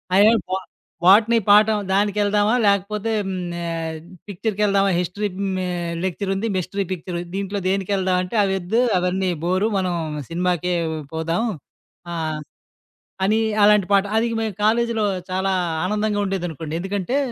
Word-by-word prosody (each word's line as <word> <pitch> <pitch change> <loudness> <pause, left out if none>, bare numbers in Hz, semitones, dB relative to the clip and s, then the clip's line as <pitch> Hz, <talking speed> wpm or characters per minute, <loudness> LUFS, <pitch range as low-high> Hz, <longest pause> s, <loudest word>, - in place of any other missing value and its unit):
అయ్యో 210 +3 +6 0.2
బా 190 - 0 0.5
బొటనీ 215 +5 +6
పాఠం 210 +1 +6
దానికెళ్దామా? 205 +2 +2
లేకపోతే 205 +2 +1 0.2
హ్మ్. 190 - -3 0.2
నా 175 - -5 0.7
పిక్చర్‌కెళ్దామా? 200 0 +1
హిస్టరీ 180 +4 -2 0.3
మే 185 -1 -2 0.4
లెక్చరుంది, 195 +3 -2
మిస్టరీ 185 +2 -2
పిక్చరు, 175 -1 -4 0.2
దీంట్లో 200 +1 -2
దేనికెళ్దామంటే 190 0 0
అవి 195 -1 +1
వద్దు 215 +7 +1 0.2
అవన్నీ 180 +1 0
బోరు 185 +4 +1
మనం 185 -2 0 0.4
సినిమాకే 180 0 0 0.4
పోదాం. 165 +7 -1 0.7
ఆహ్, 155 -2 -3 0.9
అని 215 +2 +2 0.3
అలాంటి 210 -2 +5
పాట. 200 0 +5
అది 230 +1 +3
మేము 220 -3 -2
కాలేజీలో 230 0 +2 0.3
చాలా 190 +1 0 0.3
ఆనందంగా 210 +1 0
ఉండేదనుకోండి. 165 -5 -4
ఎందుకంటే 200 +7 -1
195 Hz, 120 wpm, -22 LUFS, 180-210 Hz, 0.9 s, అయ్యో